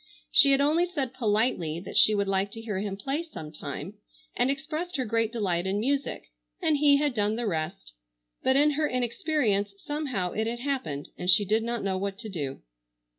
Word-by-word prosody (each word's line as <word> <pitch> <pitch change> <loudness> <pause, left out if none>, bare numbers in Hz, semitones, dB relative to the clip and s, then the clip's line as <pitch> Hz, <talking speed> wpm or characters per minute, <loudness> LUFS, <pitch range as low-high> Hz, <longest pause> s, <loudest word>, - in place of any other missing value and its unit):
She - - +7
had 275 0 +4
only 320 +5 +3
said 280 -8 -3
politely 210 -9 0
that 180 - -9
she 215 - +6
would 200 -1 0
like 195 +1 +1
to 225 - -7
hear 210 -4 -3
him 195 -1 -3
play 275 +10 -2
sometime, 160 - -7 0.4
and 245 +2 +2
expressed 310 +6 -3
her 260 -3 0
great 225 0 +1
delight 190 -6 0
in 195 +2 0
music, 275 +5 -2 0.3
and 320 -5 +2
he 285 -1 +5
had 290 -1 +1
done 210 -1 +1
the 240 +1 -2
rest, 155 - -3 0.5
but 260 - +3
in 295 +2 +5
her 300 +1 +1
inexperience 240 - 0
somehow 270 - -2
it 220 +1 -1
had 240 +1 -3
happened 245 - -3
and 180 - -2
she 195 +3 +5
did 215 +3 +2
not 235 +1 -2
know 190 -1 -1
what 195 0 -3
to 220 +1 -7
do. 145 -8 -5
225 Hz, 195 wpm, -27 LUFS, 195-280 Hz, 0.5 s, She